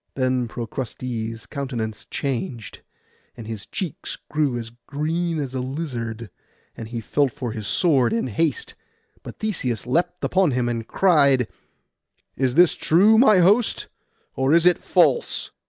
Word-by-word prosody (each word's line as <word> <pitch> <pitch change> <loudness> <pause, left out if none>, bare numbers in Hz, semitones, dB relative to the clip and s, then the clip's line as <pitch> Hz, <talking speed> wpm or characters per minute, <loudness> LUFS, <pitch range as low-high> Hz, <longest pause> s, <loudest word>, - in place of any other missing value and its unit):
Then 130 -2 0
Procrustes' 115 -1 -5
countenance 120 -7 -5
changed, 130 - -4 0.6
and 115 - -8
his 110 -2 -7
cheeks 180 -6 -5
grew 150 -5 +1
as 115 -1 -6 0.2
green 165 +3 -1
as 135 -3 -4
a 130 - -2
lizard, 120 - -5 0.4
and 115 - -7
he 120 +1 -5
felt 135 +4 0
for 120 0 -5
his 110 -2 -6
sword 135 - +2
in 115 +1 0
haste; 165 - -1 0.5
but - - -10
Theseus 150 - -2
leapt 175 +7 0
on 185 -5 +4
him, 125 -1 0
and 115 -1 -3
cried— 140 - +3 0.9
'Is 130 -1 0
this 175 0 +6
true, 205 +7 +4
my 215 -7 +6
host, 210 +7 +3 0.5
or 135 +4 +3
is 170 0 +4
it 180 -1 +5
false? 475 - +1
130 Hz, 140 wpm, -23 LUFS, 115-170 Hz, 0.9 s, this